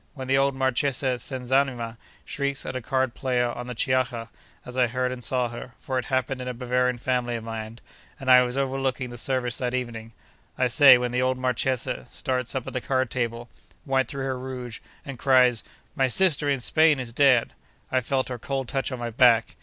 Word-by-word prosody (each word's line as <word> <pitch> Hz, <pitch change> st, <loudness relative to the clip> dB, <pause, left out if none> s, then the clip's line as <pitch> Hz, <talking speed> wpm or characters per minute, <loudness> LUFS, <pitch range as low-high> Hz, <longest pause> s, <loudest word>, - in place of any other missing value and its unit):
When 130 Hz, -2 st, -6 dB
the 135 Hz, -, +3 dB
old 135 Hz, 0 st, +2 dB
Marchesa 130 Hz, -1 st, 0 dB
Senzanima 130 Hz, -3 st, -1 dB, 0.3 s
shrieks 140 Hz, -1 st, -2 dB
at -, -, -5 dB
a 130 Hz, -, -3 dB
card 130 Hz, 0 st, 0 dB
party 130 Hz, -2 st, -1 dB
on 120 Hz, 0 st, -3 dB
the 125 Hz, -, -6 dB
Chiaja—as 125 Hz, 0 st, -3 dB
I 125 Hz, -1 st, +3 dB
heard 125 Hz, +1 st, -1 dB
and 125 Hz, -1 st, -6 dB
saw 125 Hz, +1 st, 0 dB
her, 120 Hz, +1 st, -9 dB
for 130 Hz, -1 st, -2 dB
it 125 Hz, -, -5 dB
happened 130 Hz, 0 st, -1 dB
in 125 Hz, -, -6 dB
a 125 Hz, -, -4 dB
Bavarian 125 Hz, 0 st, 0 dB
family 120 Hz, -1 st, -1 dB
of 115 Hz, -, -5 dB
mine, 110 Hz, 0 st, -6 dB, 0.4 s
and 130 Hz, -2 st, +1 dB
I 125 Hz, 0 st, +9 dB
was 125 Hz, +1 st, -2 dB
overlooking 135 Hz, -2 st, -1 dB
the 120 Hz, -, -8 dB
service 125 Hz, -1 st, -1 dB
that 125 Hz, -1 st, -1 dB
evening—I 115 Hz, +1 st, -6 dB
say, 130 Hz, +1 st, +7 dB
when 125 Hz, 0 st, -2 dB
the 125 Hz, +1 st, 0 dB
old 130 Hz, 0 st, +1 dB
Marchesa 130 Hz, -, -1 dB
starts 125 Hz, -1 st, -2 dB
up 130 Hz, -, -2 dB
at -, -, -7 dB
the 130 Hz, -, -2 dB
card 130 Hz, -1 st, 0 dB
table, 120 Hz, -1 st, -3 dB, 0.4 s
white 135 Hz, -2 st, +1 dB
through 140 Hz, -2 st, -5 dB
her 130 Hz, -1 st, -2 dB
rouge, 125 Hz, -3 st, -7 dB, 0.3 s
and 135 Hz, -4 st, -7 dB
cries, 125 Hz, -3 st, +4 dB, 0.3 s
"My 135 Hz, -3 st, +2 dB
sister 150 Hz, 0 st, +2 dB
in 135 Hz, -3 st, 0 dB
Spain 155 Hz, +2 st, +3 dB
is 120 Hz, -2 st, -6 dB
dead! 130 Hz, -3 st, +4 dB, 0.4 s
I 130 Hz, -, +2 dB
felt 130 Hz, +2 st, -1 dB
her 125 Hz, -1 st, -5 dB
cold 135 Hz, +2 st, -3 dB
touch 135 Hz, +2 st, -2 dB
on 130 Hz, -, -4 dB
my 120 Hz, -1 st, -4 dB
back!" 115 Hz, -2 st, +4 dB
125 Hz, 200 wpm, -25 LUFS, 120-130 Hz, 0.4 s, I